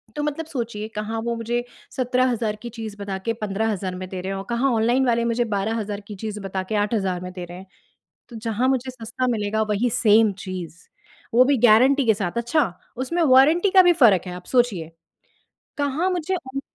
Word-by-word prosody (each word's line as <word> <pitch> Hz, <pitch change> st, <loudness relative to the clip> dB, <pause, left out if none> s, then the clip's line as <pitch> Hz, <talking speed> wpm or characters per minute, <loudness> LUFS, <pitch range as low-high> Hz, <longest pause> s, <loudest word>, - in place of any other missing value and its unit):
तो 295 Hz, -, -2 dB
मतलब 300 Hz, +2 st, -2 dB
सोचिए 235 Hz, -8 st, -4 dB
कहाँ 220 Hz, +2 st, -3 dB
वो 235 Hz, 0 st, -2 dB
मुझे 240 Hz, +1 st, -2 dB, 0.3 s
17,000 250 Hz, -4 st, +1 dB
की 240 Hz, -, -6 dB
चीज़ 220 Hz, -3 st, -7 dB
बता 200 Hz, -1 st, -4 dB
के 230 Hz, -, +1 dB
15,000 200 Hz, -2 st, -2 dB
में 185 Hz, 0 st, -6 dB
दे 185 Hz, -1 st, -5 dB
रहे 190 Hz, +1 st, -4 dB
हैं 195 Hz, -, -3 dB
और 195 Hz, -, -6 dB
कहाँ 245 Hz, +3 st, +1 dB
ऑनलाइन 240 Hz, +4 st, +2 dB
वाले 235 Hz, -1 st, +2 dB
मुझे 235 Hz, +1 st, +1 dB
12,000 210 Hz, 0 st, -2 dB
की 210 Hz, -, -7 dB
चीज़ 210 Hz, -1 st, -4 dB
बता 190 Hz, -1 st, -3 dB
के -, -, +1 dB
8,000 195 Hz, -4 st, -1 dB
में 180 Hz, 0 st, -6 dB
दे 180 Hz, -2 st, -6 dB
रहे 175 Hz, +1 st, -10 dB
हैं। 190 Hz, -, -11 dB, 0.6 s
तो 235 Hz, -, -10 dB
जहाँ 225 Hz, +3 st, -1 dB
मुझे 260 Hz, -1 st, 0 dB
सस्ता 240 Hz, +1 st, -4 dB
मिलेगा 215 Hz, 0 st, -1 dB
वही 220 Hz, +4 st, +1 dB
सेम 215 Hz, -1 st, +4 dB
चीज़, 180 Hz, -3 st, -7 dB, 0.6 s
वो 250 Hz, +2 st, +7 dB
भी 280 Hz, 0 st, +3 dB
गारंटी 260 Hz, +5 st, +5 dB
के 220 Hz, -, +5 dB
साथ, 200 Hz, +1 st, -3 dB
अच्छा 240 Hz, +6 st, +1 dB, 0.3 s
उसमें 335 Hz, +7 st, -1 dB
वारंटी 310 Hz, +7 st, +5 dB
का 375 Hz, -1 st, +7 dB
भी 355 Hz, -1 st, +5 dB
फ़र्क 230 Hz, -, +5 dB
है 180 Hz, -, -5 dB
आप 180 Hz, 0 st, -9 dB
सोचिए। 215 Hz, -11 st, +1 dB, 0.9 s
कहाँ 290 Hz, +6 st, 0 dB
मुझे 360 Hz, +1 st, -1 dB, 0.2 s
उन 275 Hz, -, -1 dB
225 Hz, 200 wpm, -23 LUFS, 205-255 Hz, 0.9 s, वो